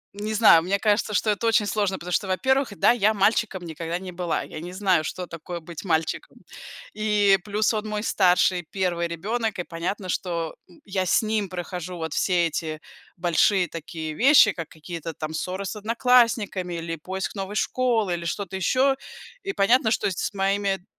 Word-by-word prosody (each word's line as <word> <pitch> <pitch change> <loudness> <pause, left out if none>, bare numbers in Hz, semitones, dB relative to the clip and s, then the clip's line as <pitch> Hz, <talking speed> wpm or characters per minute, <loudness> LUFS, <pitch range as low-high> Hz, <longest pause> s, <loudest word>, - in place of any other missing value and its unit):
не 210 +1 -3
знаю, 210 -7 +7
мне 190 +4 0
кажется, 210 0 +1
что 215 +3 +2
это 210 +3 -1
очень 225 -2 +3
сложно, 205 -2 0
потому 180 0 -8
что, 195 - 0
во-первых, 260 +3 +1
да, 200 - +5
я 220 -2 +2
мальчиком 200 -2 +1
никогда 165 +1 -4
не 185 0 -7
была, 175 -1 -2
я - - -8
не 175 +3 -7
знаю, 185 -4 +2
что 180 +3 -4
такое 170 +1 -7
быть 165 0 -9
мальчиком. 165 -4 -1 0.6
И 210 -2 +3
плюс 210 +2 0
он 215 0 -2
мой 210 0 -3
старший 180 -3 +3
1 175 -3 -1
ребенок 215 +6 -2
и - - -1
понятно, 180 +3 -4
что 170 -3 -2 0.3
я 190 -2 -1
с 175 - +3
ним 215 -2 -1
прохожу 180 0 -6
вот 160 -2 -4
все 180 -2 +2
эти 155 -1 -4 0.4
большие 180 +2 +2
такие 160 -1 -6
вещи, 250 - +6
как 165 -5 -7
какие-то 165 +1 -7
там 155 0 -5
ссоры 185 +4 -3
с 195 - -4
одноклассниками 220 -5 +2
или 165 0 -4
поиск 190 +5 -4
новой 195 +1 -5
школы 225 -5 +1
или 170 0 -4
что-то 190 +3 -4
еще 255 +9 +2 0.5
и 395 - -2
понятно, 230 - +3
что - - +1
с 185 - -3
моими 195 -1 0
190 Hz, 175 wpm, -24 LUFS, 170-210 Hz, 0.6 s, знаю